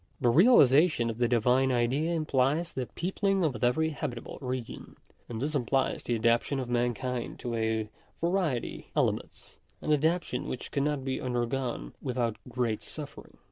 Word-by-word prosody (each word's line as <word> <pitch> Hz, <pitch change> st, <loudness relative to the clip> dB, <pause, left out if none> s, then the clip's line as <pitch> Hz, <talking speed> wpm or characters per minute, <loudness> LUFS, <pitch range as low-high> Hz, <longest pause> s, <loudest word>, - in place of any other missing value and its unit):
The 120 Hz, -, +3 dB
realization 150 Hz, -, +5 dB
of 115 Hz, -, -9 dB
the 120 Hz, -, +3 dB
Divine 125 Hz, +3 st, +3 dB
Idea 130 Hz, +7 st, +1 dB
implies 150 Hz, +1 st, +1 dB
the 130 Hz, -2 st, -3 dB
peopling 195 Hz, +1 st, 0 dB
of 130 Hz, -9 st, -1 dB
every 160 Hz, +6 st, +2 dB
habitable 140 Hz, -5 st, -5 dB
region; 125 Hz, -2 st, -5 dB, 0.3 s
and 115 Hz, -2 st, -4 dB
this 145 Hz, +5 st, -2 dB
implies 135 Hz, -1 st, 0 dB
the 120 Hz, -, -1 dB
adapt 115 Hz, +1 st, +3 dB
ation 140 Hz, -, -2 dB
of 130 Hz, -, -3 dB
mankind 120 Hz, 0 st, -1 dB
to 120 Hz, -, -3 dB
a 110 Hz, -1 st, 0 dB, 0.3 s
variety 170 Hz, -8 st, -1 dB
of -, -, +4 dB
climates -, -, -5 dB
— -, -, -38 dB
an 155 Hz, -, +2 dB
adaptation 150 Hz, -3 st, 0 dB
which 125 Hz, -, -5 dB
cannot 140 Hz, -1 st, -1 dB
be 130 Hz, -1 st, -2 dB
undergone 120 Hz, -, -2 dB
without 120 Hz, -3 st, -1 dB
great 120 Hz, -3 st, -1 dB
suffering. 150 Hz, -3 st, -8 dB
130 Hz, 160 wpm, -29 LUFS, 120-150 Hz, 0.3 s, realization